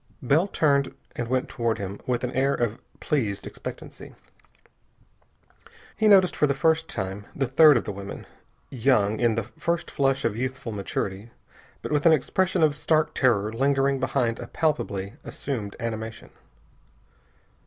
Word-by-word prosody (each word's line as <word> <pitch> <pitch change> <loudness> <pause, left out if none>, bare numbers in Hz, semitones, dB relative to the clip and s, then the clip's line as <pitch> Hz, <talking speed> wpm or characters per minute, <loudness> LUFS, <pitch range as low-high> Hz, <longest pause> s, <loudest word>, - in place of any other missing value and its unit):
Bell 150 +9 +3
turned 140 -7 +1 0.2
and 120 - -3
went 130 +1 0
toward 115 -2 -1
him 100 0 -6
with 125 -1 0
an 125 - -1
air 135 +2 +1
of 120 0 -2 0.2
pleased 110 -10 -1
expectancy. - - -9 1.8
He 220 - +2
noticed 190 -3 +6
for 150 - +3
the 140 - 0
first 160 +2 +2
time 95 0 -5
the 135 - 0
third 145 +2 +6
of 115 - -1
the - - -4
women. 100 0 -8 0.5
Young, 110 -5 +2
in 120 -2 +2
the 115 - -1
first 160 +10 -3
flush 135 0 +1
of 110 - 0
youthful 130 0 -4
maturity, 100 +1 -4 0.5
but - - -5
with 150 +2 +3
an 165 - +7
expression 180 +4 +1
of 150 -2 +3
stark 155 +1 +1
terror 110 -5 +2
lingering 135 +2 +1
behind 125 -3 0
a - - -7
palpably 105 - -1
assumed 110 -8 -5
animation. 115 -1 -5
130 Hz, 150 wpm, -25 LUFS, 110-145 Hz, 1.8 s, an